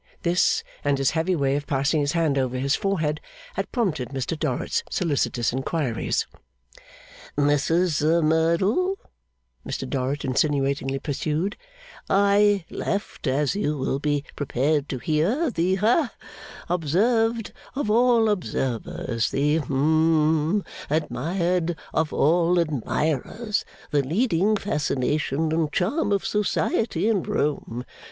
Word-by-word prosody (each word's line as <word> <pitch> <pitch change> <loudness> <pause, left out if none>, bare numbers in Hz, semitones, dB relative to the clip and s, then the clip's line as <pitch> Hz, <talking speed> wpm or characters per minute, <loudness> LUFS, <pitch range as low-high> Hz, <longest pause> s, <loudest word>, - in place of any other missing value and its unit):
This, 175 +1 +2 0.2
and 145 -1 +2
his 135 0 +2
heavy 165 +3 0
way 140 -3 +1
of 145 0 -3
passing 145 +2 +1
his 145 0 0
hand 165 -4 +1
over 130 -2 0
his 135 +2 +1
forehead, 160 -7 -1 0.3
had - - -4
prompted 175 - -1
Mr 135 +3 -3
Dorrit's 150 -5 -1
solicitous 140 -8 0
inquiries. 135 -2 -1 1.1
'Mrs 155 +2 +2
Merdle,' 170 - +2 0.7
Mr - - -4
Dorrit 135 0 -2
insinuatingly 135 0 0
pursued, 155 +7 -2 0.5
'I 200 -1 +4
left, 200 -5 -3
as 140 +5 +1
you 155 -7 -1
will 135 0 -1
be 145 -1 0
prepared 145 +1 0
to 135 - -2
hear, 175 - +1
the 180 -1 +1
ha 235 - +2 0.6
observed 225 - +1 0.2
of 265 -6 -1
all 235 0 +4
observers, 125 - -1
the 145 +3 +1
hum 155 +4 +2 0.3
admired 165 +4 0 0.2
of 160 -1 +1
all 170 +3 +3
admirers, 155 - -1 0.3
the 145 -2 +3
leading 190 - +1
fascination 150 -4 -1
and 160 -2 0
charm 210 - 0
of 200 -1 +1
Society 210 +1 0
in 215 -5 +2
Rome. 135 -6 -2
160 Hz, 115 wpm, -24 LUFS, 140-190 Hz, 1.1 s, I